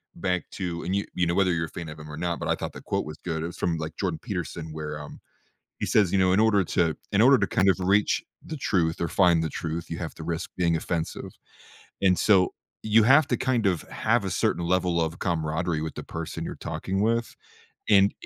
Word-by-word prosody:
back 90 -1 -2
to 85 -3 -4
and 90 - -2
you 100 - 0
you 90 - +1
know, 85 - 0
whether 95 -3 +3
you're 80 -1 0
a - - -10
fan 85 - -7
of 75 0 -9
him 75 0 -9
or 75 - -7
not, 85 0 -2
but - - -4
I - - +3
thought - - -5
the - - -9
quote - - -2
was 75 0 -8
good. 80 -2 -2
It - - -2
was 85 - -9
from, 85 -2 0
like, 80 0 -5
Jordan 90 -5 -2
Peterson 85 -6 -5
where, 75 -1 -5
um, 75 - -10 0.6
he - - -1
says, 100 -5 +3
"You 100 - +2
know, 95 -1 +4
in 100 - +3
order 105 -3 +4
to 80 -1 +1 0.2
in 100 +1 +3
order 130 +2 +7
to - - 0
kind 95 - +3
of 95 - +2
reach 100 +3 +2 0.2
the 155 - -5
truth 85 -9 0
or 85 - +1
find 85 -4 +4
the 80 - -1
truth, 85 -1 -4
you 85 - -4
have 85 -3 -5
to 80 - -8
risk 85 0 -3
being 85 -2 +2
offensive," 80 0 -3 0.7
and 95 -2 +4
so 95 -4 +4 0.3
you 110 0 +5
have 140 +5 +6
to 125 - +1
kind 125 -5 0
of 90 -4 +1
have - - 0
a - - -1
certain 85 - 0
level 90 -1 +1
of 80 +1 -2
camaraderie 80 -2 -1
with 80 -1 -5
the - - -6
person 80 0 -5
you're - - -5
talking 95 +5 -3
with 115 +1 0 0.6
and 100 0 +6
85 Hz, 245 wpm, -26 LUFS, 80-100 Hz, 0.7 s, order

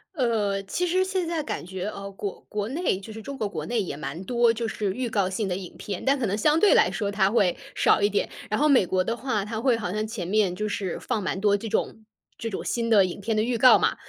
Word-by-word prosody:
呃， 215 -7 0
其 360 - -2
实 370 +2 +2
现 375 -2 -1
在 330 -1 -1
感 295 - -5
觉， 185 +1 -5
呃， 200 -1 -6
国 195 0 -6
国 210 0 -2
内， 290 - 0
就 215 +3 -10
是 220 - -8
中 275 +3 -7
国 215 - -1
国 155 -6 -5
内 230 +4 0
也 170 -6 -4
蛮 160 +3 -6
多 240 +1 +3
就 230 0 -2
是 205 -3 -2
预 250 +1 -3
告 200 -4 +1
性 195 +2 -2
的 180 - -1
影 185 -2 -8
片。 200 -3 -5
但 275 0 +2
可 240 - 0
能 205 0 -1
相 300 +8 +3
对 420 - +6
来 - - +4
说 205 -2 -2
它 200 -1 +2
会 195 -7 +2 0.2
少 - - +4
一 205 - +4
点。 205 - 0 0.2
然 215 - 0
后 300 - +4
美 260 -10 +5
国 185 +1 +1
的 230 +5 -2
话， 230 -5 -2
它 220 +1 -4
会 250 -3 +3
好 205 -6 -3
像 215 +2 -1
前 215 -6 -5
面 200 -2 +2
就 210 +4 -3
是 195 -3 -3
放 210 - -2
蛮 190 - -2
多 205 0 +3
这 220 +2 -4
种 220 - -2 0.3
这 225 - -4
种 195 - -4
新 230 -1 -1
的 205 -4 +6
影 185 +2 -6
片 220 +1 -1
的 - - +3
预 235 +1 0
告 255 +2 +7
嘛。 - - +1
215 Hz, 295 characters per minute, -25 LUFS, 195-240 Hz, 0.3 s, 告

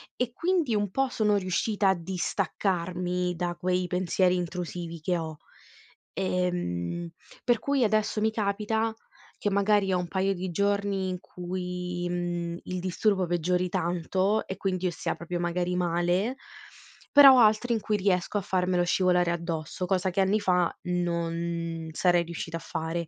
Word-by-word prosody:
e 245 -1 -1
quindi 335 -7 +1
un 205 -2 0
po' 270 +3 +1
sono 210 -3 +2
riuscita 195 +2 +1
a - - +5
distaccarmi 180 0 -1
da 175 0 -2
quei 180 0 0
pensieri 180 0 +2
intrusivi 175 -1 -4
che 175 +2 0
ho, 160 -2 -5 0.8
ehm, 175 - -2 0.4
per 240 -2 +3
cui 280 -3 +1
adesso 215 0 +1
mi 220 0 +2
capita 220 +1 -1 0.5
che 205 - 0
magari 200 -1 +2
ho 180 - +2
un 175 - -3
paio 195 0 +1
di 185 0 -4
giorni 200 0 0
in 180 -1 -3
cui, 180 0 -4
ehm, 175 -1 -2
il 185 0 -4
disturbo 190 +1 +1
peggiori 180 +1 0
tanto 185 +5 0
e 190 - -5
quindi 185 -2 -2
io 180 - +1
stia - - -3
proprio 175 +1 -4
magari 175 +1 -1
male, 175 +7 +1 0.8
però 275 -2 +10
ho - - +6
altri 220 +2 +4
in 225 - +1
cui 215 - 0
riesco 190 0 +1
a - - 0
farmelo 180 -1 +1
scivolare 180 -1 +2
addosso, 170 +1 -3
cosa 185 0 +1
che 185 - -2
anni 195 +3 +2
fa 180 -3 +2
non 170 -1 -2
sarei 175 +1 +3
riuscita 165 0 -5
a - - -8
fare. 165 +1 -4
180 Hz, 155 wpm, -27 LUFS, 175-200 Hz, 0.8 s, però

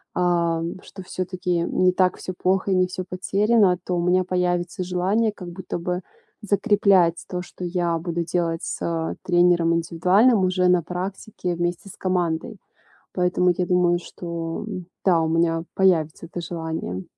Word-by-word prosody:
ам, 170 -1 0
что 190 - -11
всё-таки 180 -1 -2
не 185 +2 +2
так 180 0 +2
всё 185 - -6
плохо 190 +2 +1
и - - +3
не 185 0 +3
всё 185 0 -5
потеряно, 195 +1 +2
то 180 - -1
у 175 - 0
меня 180 +1 +3
появится 180 0 -1
желание 190 +5 +1
как 180 -4 -9
будто 175 +1 -5
бы 180 +1 -3 0.4
закреплять 200 -5 +3
то, 180 -1 -3
что 180 - -10
я 175 -1 0
буду 170 0 -2
делать 165 -1 -1
с, - - -4
э, 165 -1 -2
тренером 175 -2 +3
индивидуальным 180 +8 +3
уже 180 0 +2
на 180 -1 +4
практике 180 +2 -4
вместе 175 +3 -3
с - - -11
командой. 180 +2 -1 0.6
Поэтому 180 0 +2
я 180 - +1
думаю, 175 -1 +3
что, 170 +1 -5
м, 185 -4 -5 0.2
да, 175 -4 +4
у 160 - 0
меня 165 0 +1
появится 170 -4 +1
это 175 - -6
желание. 160 - -4
180 Hz, 160 wpm, -23 LUFS, 170-185 Hz, 0.6 s, на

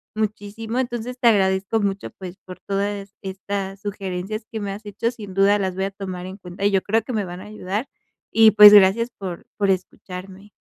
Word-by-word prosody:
muchísimo. 215 +2 -3
Entonces, 245 0 -3
te 240 - +3
agradezco 190 0 +2
mucho 200 -1 -2
pues, 185 0 -9
por 185 -1 -10
toda 200 +1 -1
es 195 0 -13
estas 195 0 -5
sugerencias 200 +1 -4
que 220 - -4
me 200 -1 -3
has 210 +2 -8
hecho, 230 +3 -2
sin 205 -5 -10
duda 200 +1 +4
las 190 -2 -2
voy 190 +1 -1
a 195 - -3
tomar 185 -2 -6
en 190 +1 -8
cuenta, 185 +1 -6
y 205 - +4
yo 190 -1 +2
creo 220 +2 +1
que 250 - -6
me 210 -3 -1
van 180 0 -8
a 205 - -10
ayudar, 210 +3 -4 0.4
y 220 -1 +7
pues, 210 0 +10
gracias 205 +4 +6
por 185 -3 -6
por 200 -2 +1
escucharme. 185 +1 -6
200 Hz, 210 wpm, -22 LUFS, 190-215 Hz, 0.4 s, pues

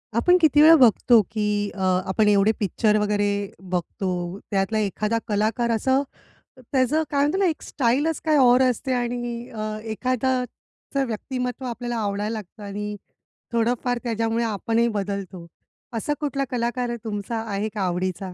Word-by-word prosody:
आपण 355 +10 +5
किती 300 -1 +5
वेळा 325 +2 +9
बघतो, 240 -3 +5
की 215 -1 -1 0.3
अ, - - -9 0.3
आपण 210 +2 +2
एवढे 205 +1 +4
पिक्चर 210 +2 +2
वगैरे 205 -1 +1 0.4
बघतो 185 +1 -2 0.4
त्यातला 195 +2 0
एखादा 210 +2 -1
कलाकार 220 +3 0
असं, 260 +5 +2 0.6
त्याचं 260 +4 +1
काय 280 - 0
म्हणतात 300 +7 +1
ना 390 - +3
एक 320 -4 -1
स्टाईलच 285 +5 0
काही 310 -1 +3
और 250 -1 +6
असते 255 +2 -2
आणि 240 -1 -3
अ, 215 -1 -4 0.2
एखाद्याचं 255 +2 -2
व्यक्तिमत्त्व 250 +3 -4
आपल्याला 240 0 -4
आवडायला 205 0 -2
लागतं 210 -1 -8
आणि 205 +1 -5 0.6
थोडंफार 245 +1 +1
त्याच्यामुळे 230 0 0
आपणही 230 +2 0
बदलतो. 195 -3 -4 0.5
असा 230 +6 -1
कुठला 280 -2 -1
कलाकार 245 0 -1
आहे 235 - -3
तुमचा 220 +1 -3
आहे 205 +1 -2
का 210 - -3
आवडीचा? 185 +1 -2
230 Hz, 145 wpm, -24 LUFS, 210-255 Hz, 0.6 s, वेळा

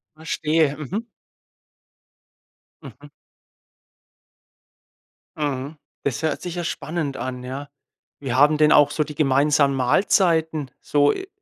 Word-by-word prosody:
Verstehe. 155 -1 0
Mhm. 200 - -5 1.8
Mhm. - - -13 2.3
Mhm. 145 0 -3 0.3
Das 140 +1 -2
hört 155 - -1
sich 175 -1 -6
ja 175 - -3
spannend 155 -3 -3
an, 125 -1 -5
ja. 135 +3 -7 0.5
Wie 135 -4 -4
haben 150 +3 +4
denn 150 0 +4
auch 145 0 +6
so 155 - 0
die 150 -1 -10
gemeinsamen 140 0 +3
Mahlzeiten 160 +1 +1
so, 145 -1 +2
äh, 380 - -7
150 Hz, 110 wpm, -22 LUFS, 140-160 Hz, 2.3 s, auch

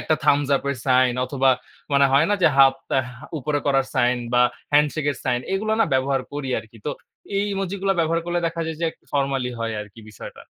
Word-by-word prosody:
একটা 155 - +1
thumbs 145 -1 +3
up 135 - -6
এর 140 - -3
sign 130 -1 +4
অথবা 135 0 +2 0.4
মানে 140 0 +5
হয় 145 +4 +5
না 205 - +4
যে - - +7
হাফ 135 -1 +7 0.2
আ - - +4 0.4
উপরে 145 +2 -1
করার 135 -1 +2
সাইন 125 0 +2 0.2
বা 125 - +5 0.3
হ্যান্ডশেক 150 +1 +2
এর 140 - -5
সাইন 125 -1 +1
এগুলো 215 +3 0
না - - +6
ব্যবহার 135 0 +1
করি 145 -2 -4
আরকি। 110 +1 -12
তো - - 0 0.5
এই 200 - +1
ইমোজি 195 -1 -3
গুলো 195 0 +3
ব্যবহার 165 +1 +1
করলে 175 0 0
দেখা 165 0 -3
যায় 160 -1 -4
যে 170 - 0
এক - - -21 0.2
ফর্মালি 135 -3 0
হয় 115 0 -2 0.4
আরকি। 105 - -10
140 Hz, 210 wpm, -23 LUFS, 130-160 Hz, 0.5 s, যে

